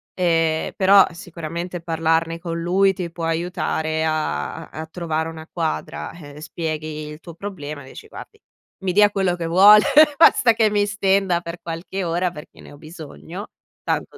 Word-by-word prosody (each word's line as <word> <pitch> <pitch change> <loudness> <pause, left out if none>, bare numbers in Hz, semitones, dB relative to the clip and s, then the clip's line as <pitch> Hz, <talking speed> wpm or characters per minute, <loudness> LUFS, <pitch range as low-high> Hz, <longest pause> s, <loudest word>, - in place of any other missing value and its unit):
Ehm, 165 -3 +1
però, 195 0 +6
sicuramente, 170 0 -6
parlarne 165 0 0
con 170 -1 -4
lui 190 +3 +2
ti 180 -3 -5
può 165 -1 -5
aiutare 165 -1 -2
a 155 +1 -2
a - - -26
a - - -6
trovare 160 -1 -3
una 160 -1 -10
quadra. 165 -3 -4
Eh, 150 -3 -12
spieghi 155 -1 -5
il 150 0 -9
tuo 170 0 -12
problema 155 -7 -7
e 130 - -13
dici: - - -12
"Guardi, - - -12 0.4
mi 185 -1 -1
dia 205 +1 +5
quello 190 -3 0
che 170 -1 -5
vuole, 200 +5 +7 0.3
basta 250 -6 +6
che 220 -1 +2
mi 205 0 +1
stenda 195 -3 +1
per 170 0 -7
qualche 170 +3 -5
ora, 175 +1 -1
perché 150 -3 -13
ne - - -13
ho 145 - -13
bisogno". 165 +4 -10 0.4
Tanto, - - -2
170 Hz, 170 wpm, -21 LUFS, 160-190 Hz, 0.4 s, vuole